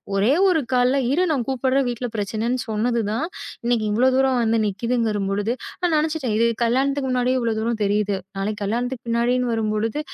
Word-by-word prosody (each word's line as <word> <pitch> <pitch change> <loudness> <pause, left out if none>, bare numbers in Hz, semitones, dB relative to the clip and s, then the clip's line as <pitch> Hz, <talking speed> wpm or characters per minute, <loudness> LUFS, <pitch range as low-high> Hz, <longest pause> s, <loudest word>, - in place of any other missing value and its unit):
ஒரே 205 +7 +3 0.2
ஒரு 320 -4 +2
கால்ல 250 +2 +3
இரு 345 +6 +2
நான் 255 -5 -1
கூப்பிடுறேன். 265 +1 +1
வீட்ல 245 +1 -3
பிரச்சனைன்னு 225 +5 -1
சொன்னது 230 +2 0
தான் 280 +9 -1 0.4
இன்னக்கி 235 -2 +1
இவ்ளோ 240 +5 +3
தூரம் 265 -1 +3
வந்து 225 0 +2
நிக்குதுங்கம்பொழுது 205 -1 -1 0.3
நான் 350 -3 +2
நினைச்சுட்டேன். 310 -7 -2
இது 230 - +3 0.2
கல்யாணத்துக்கு 270 +3 +1
முன்னாடி 250 0 +1
இவ்ளோ 235 -2 0
தூரம் 225 0 -1
தெரியுது. 205 0 +1 0.2
நாளைக்கு 205 +1 -3
கல்யாணத்துக்கு 240 +4 -2
பின்னாடின்னு 240 +2 +1
வரும்பொழுது, 220 +3 -1
235 Hz, 160 wpm, -22 LUFS, 215-255 Hz, 0.4 s, ஒரே